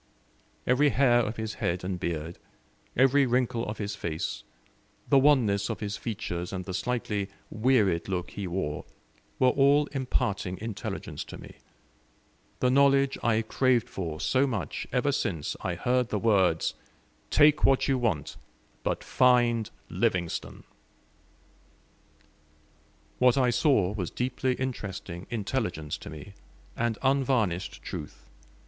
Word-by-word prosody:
Every 140 +4 +4
hair 120 -1 +4
of 115 -1 -1
his 110 0 -3
head 85 +1 -1
and 90 -1 -3
beard, 85 0 -4 0.6
every 135 +2 +4
wrinkle 120 -1 0
of 105 - -4
his 100 -1 -3
face, 80 -5 -3 0.7
the 140 - +5
wanness 120 -9 +3
of - - -3
his 100 -2 -3
features, 90 -6 -4
and 90 -2 -4
the 95 - -5
slightly 105 -1 -2 0.2
wearied 105 -8 +2
look 90 -2 -2
he 100 -2 -5
wore, 85 -5 -3 0.5
were 130 - +4
all 140 +3 +4
imparting 105 -9 -1
intelligence 110 -2 -5
to - - -9
me - - -12 1.0
the 125 - +3
knowledge 140 0 +4
I 115 -1 +2
craved 125 +1 +2
for 80 -5 -5
so 135 +2 +2
much 105 - -3
ever - - +1
since 75 -3 -2
I 90 - -2
heard 125 +5 +1
the 105 - -1
words, 95 -6 +2 0.6
"Take 150 0 +5
what 135 -1 +4
you 135 -2 +2
want, 110 -11 -1 0.4
but - - -2
find 120 -3 +3 0.2
Livingstone." 90 -3 -2 2.6
What 125 0 +5
I 125 -2 +3
saw 115 - +3
was 95 -5 -3
deeply 125 +1 -1
interesting 100 -8 -5
intelligence 105 - -2
to - - -9
me, 80 +6 -10 0.4
and 115 -1 -1
unvarnished 125 -10 +1
truth. - - -7
110 Hz, 130 wpm, -28 LUFS, 95-130 Hz, 2.6 s, the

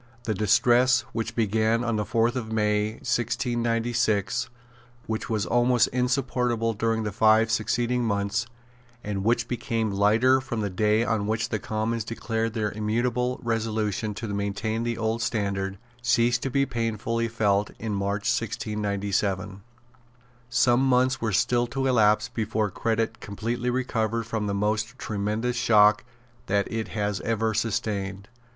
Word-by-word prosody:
The 115 -3 -1
distress 120 +5 +4
which 115 0 -3
began 110 +1 +1
on 120 -2 0
the 105 -1 -1
fourth 115 +1 +1
of 110 -3 -4
May 105 -1 +1
1696, 120 -2 0 0.6
which 110 0 -4
was 110 -4 0
almost 120 +4 +3
insupportable 125 -2 0
during 110 +1 0
the 105 - -2
five 110 +1 +4
succeeding 120 +2 0
months, 100 +1 -1 0.6
and 100 -2 -3
which 115 +2 +1
became 115 -3 -2
lighter 110 +7 +3
from 120 -4 -4
the 100 -2 -2
day 105 +4 +2
on 110 -3 0
which 110 +1 -1
the 110 - -1
Commons 110 +2 -2
declared 115 0 -3
their 105 -2 -1
immutable 120 +4 -1
resolution 110 -2 -1
to 115 - -5
maintain 100 +2 -2
the 120 -1 -2
old 115 0 -1
standard, 100 -4 -1 0.2
ceased 120 0 +2
to 135 - -2
be 140 +2 +2
painfully 115 -1 -2
felt 105 -3 +1
in 110 -1 -4
March 100 +1 -1
1697. 100 -4 -1 0.9
Some 120 0 +3
months 130 0 +2
were 115 -2 0
still 120 +5 +2
to 135 +3 -2
elapse 110 -4 +3
before 110 -3 -2
credit 115 +2 -1
completely 115 +4 -3
recovered 115 -3 -1
from 110 -2 -3
the 100 - -1
most 110 +4 -1
tremendous 110 +3 -2
shock 105 -3 +5 0.4
that 100 0 +1
it 110 -1 -2
has 105 -2 -2
ever 110 -1 0
sustained. 100 -3 -2
110 Hz, 140 wpm, -26 LUFS, 105-120 Hz, 0.9 s, shock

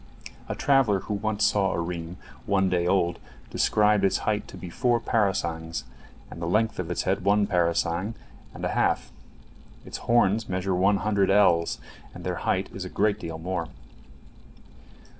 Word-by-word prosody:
A - - -2
traveller 130 -9 +3
who 105 - -4
once 105 +1 0
saw 100 -2 +2
a - - -2
reem 85 +1 -4 0.3
one 95 -2 +2
day 90 -1 +1
old 85 -2 +1 0.3
described 105 -1 +3
its 95 - +3
height 105 -1 0
to - - -10
be 90 - -8
four 120 +6 +1
parasangs, 85 -8 -1 0.5
and 85 - -9
the 85 - -2
length 110 +2 +1
of 90 -2 -3
its 90 - -1
head 95 0 0
one 100 +1 +3
parasang 85 +3 0 0.4
and - - -6
a - - 0
half. - - 0 0.7
Its - - -6
horns 115 -2 +2
measure 95 +1 -1
one 95 +3 +3
hundred 100 0 +1
ells, 90 -4 +4 0.4
and - - -9
their - - -2
height 95 +1 +1
is 95 - -5
a 95 - -6
great 105 +2 +1
deal 80 -2 -5
more. 85 0 -3
95 Hz, 165 wpm, -26 LUFS, 85-105 Hz, 0.7 s, ells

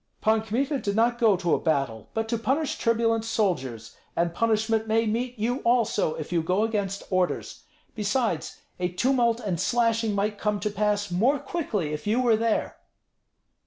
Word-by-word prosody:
"Pan 220 0 +2
Kmita 260 +6 -1
did 200 -4 -2
not 235 +2 +2
go 220 -5 +4
to 175 -2 0
a - - +2
battle, 135 -8 -1
but 225 0 -1
to 230 - 0
punish 275 +6 -1
turbulent 230 -1 +1
soldiers, 135 - -2 0.2
and 170 0 0
punishment 220 +1 +1
may 225 +1 +2
meet 240 +3 -2
you 235 +4 0
also 235 -8 +1
if 155 - -6
you 170 -2 +2
go 180 +6 +1
against 200 -3 -2
orders. 185 -1 -1 0.3
Besides, 210 -4 -1 0.2
a 180 0 0
tumult 235 +4 +1
and 195 -8 -3
slashing 230 0 +1
might 205 +1 -1
come 210 -1 0
to 210 - -1
pass 205 -1 0
more 235 +11 +3
quickly 215 - -3
if 150 - -5
you 220 +4 +2
were 240 -3 +4
there." 225 0 -1
220 Hz, 170 wpm, -26 LUFS, 185-230 Hz, 0.3 s, go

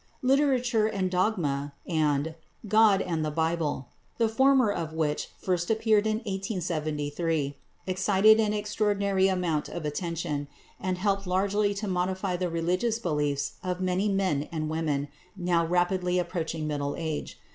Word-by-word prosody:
"Literature 255 -4 +3
and 190 -4 -1
Dogma" 160 -8 0
and 155 -2 +1 0.3
"God 210 -2 +5
and 165 -3 -1
the 155 - 0
Bible," 160 -4 -1 0.3
the 230 - +3
former 260 0 +4
of 165 -5 -3
which 155 -2 -1
first 175 -2 -1
appeared 220 -1 +3
in 215 0 +1
1873, 160 -6 -2 0.3
excited 195 +3 +4
an 215 -2 +2
extraordinary 205 -2 +1
amount 180 -5 0
of 170 - -5
attention, 150 -2 -3 0.3
and 185 -1 -2
helped 195 0 0
largely 200 +2 +1
to 205 +1 -3
modify 185 0 -1
the 180 0 -1
religious 180 +7 0
beliefs 150 -7 -1
of 180 -1 -2
many 185 +2 +1
men 185 -7 0
and 155 -2 -2
women 150 -3 -1 0.3
now 175 -2 +2
rapidly 180 +1 +1
approaching 165 -2 -2
middle 145 -1 -2
age. 160 -3 -4
180 Hz, 135 wpm, -28 LUFS, 160-200 Hz, 0.3 s, God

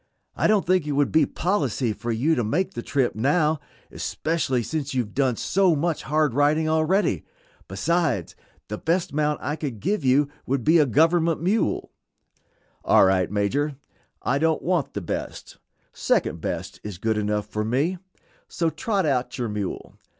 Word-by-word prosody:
"I - - +2
don't 215 -2 +3
think 180 -3 +2
it 145 - -1
would 140 0 +1
be 155 -2 +4
policy 140 - -1
for 120 +2 -4
you 130 +9 +1
to 120 - 0
make 155 - -1
the 120 - -4
trip 130 0 0
now, 150 +6 +1 0.3
especially 150 -6 -1
since 145 0 -3
you 125 - +2
have 105 - -13
done 130 -3 +1
so 185 - +2
much 160 +2 -1
hard 150 -2 +1
riding 150 +3 +2
already. 160 +6 +1 0.4
Besides, 165 - -1 0.3
the 105 - -5
best 170 0 0
mount 150 0 0
I 150 - -1
could 140 -9 -5
give 195 - -1
you 135 +2 +4 0.2
would 135 -1 0
be 165 +5 +5
a 150 - +4
government 165 +4 +2
mule." 205 +5 0 0.9
"All - - +5
right, 95 -1 +2
Major, 130 +9 0 0.5
I 135 - +1
don't 160 0 +1
want 180 -1 0
the 100 - -2
best; 85 - -6 0.3
second - - 0
best - - -4
is 105 -4 -6
good 110 +4 0
enough 105 0 -1
for 105 0 -3
me; 140 +11 0 0.5
so 165 -2 -1
trot 190 +4 -1
out 130 -4 -1
your 120 -3 -2
mule. 105 -2 -4
145 Hz, 170 wpm, -24 LUFS, 120-165 Hz, 0.9 s, be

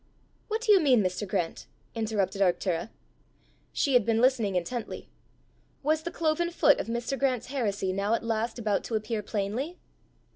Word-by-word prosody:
"What 440 +1 -2
do 455 -2 +3
you 400 - +8
mean, 260 - +4
Mr. 185 +3 -2
Grant?" 175 -3 -2 0.3
interrupted 215 -3 -1
Arctura. 180 0 +1 0.8
She 280 - 0
had 245 -3 +6
been 225 +1 +1
listening 235 -6 +2
intently: 220 +7 -4 0.7
was 310 +2 +2
the 345 - -4
cloven 335 +1 0
foot 305 -4 +4
of - - -3
Mr. 235 +4 -2
Grant's 255 -3 0
heresy 200 -7 -1
now 200 +3 +1
at - - -4
last 225 +1 -1
about 215 -4 0
to 230 - -3
appear 215 0 -2
plainly? 220 - -3
230 Hz, 160 wpm, -28 LUFS, 200-275 Hz, 0.8 s, you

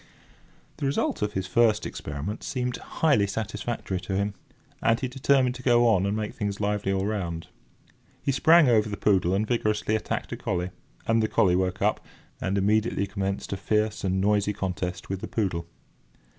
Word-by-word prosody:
The 145 - -1
result 135 - 0
of 105 0 -1
his 95 0 -2
first 110 +2 +3
experiment 75 +9 -5
seemed 125 -1 -2
highly 140 -11 +1
satisfactory 110 -1 -3
to 95 +1 -4
him, 100 +1 0 0.5
and 115 +1 +3
he 130 - -1
determined 130 0 +2
to 130 - -9
go 120 -1 +4
on 100 -4 +3
and 100 +2 0
make 105 -1 -3
things 100 -2 -3
lively 105 -1 0
all 95 0 0
round. 90 -6 -3 0.7
He - - +1
sprang 160 +3 +6
over 110 -3 +3
the 100 - -4
poodle 95 -3 +2
and 105 +2 +1
vigorously 110 -2 0
attacked 110 - -3
a - - -3
collie, 90 0 -2 0.3
and 115 0 +3
the 110 - +2
collie 90 -4 +3
woke 95 0 0
up, - - +1 0.4
and 95 +1 0
immediately 105 +1 +2
commenced 100 0 -3
a - - -2
fierce 105 +2 0
and 95 0 +1
noisy 105 +1 +2
contest 90 -2 -4
with 95 -1 -4
the - - -4
poodle. 90 -6 -2
105 Hz, 180 wpm, -26 LUFS, 95-115 Hz, 0.7 s, sprang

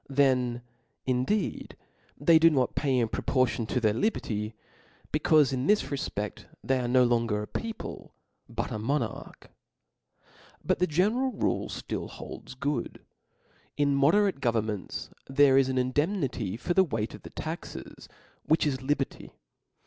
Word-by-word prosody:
Then 130 -3 +2 0.4
indeed, 130 +12 -1 0.4
they 165 -2 +6
do 165 +1 +7
not 130 -6 +1
pay 135 -3 +1
in 120 -2 +2
proportion 115 -1 0
to 125 - 0
their 110 -3 +2
liberty, 110 - -1 0.6
becaufe 150 -2 +4
in 130 +2 -1
this 210 0 +4
refpcdt 135 -8 -4 0.2
they 130 -1 +1
are 125 - -1
no 125 +1 +5
longer 115 -3 +1
a - - -7
people, 225 -2 -6 0.3
but - - -3
a 110 - -3
monarch. 140 +7 -3 1.1
But 185 +3 +1
the 180 - +3
general 215 - +2
rule - - 0
ftill - - -5
holds - - -9
good. 140 -1 -3 0.7
In 145 -1 +2
mode 140 +5 +4
rate 200 -8 +2
governments 110 -5 -2 0.2
there 135 0 +5
is 135 -1 +4
an 130 - -1
indemnity 130 - 0
for 175 +8 -1
the 190 - +5
weight 110 - -3
of - - -10
the - - -10
taxes, - - -7 0.3
which 155 +1 +2
is 135 -3 -1
liberty. 135 0 -2
135 Hz, 145 wpm, -28 LUFS, 120-155 Hz, 1.1 s, do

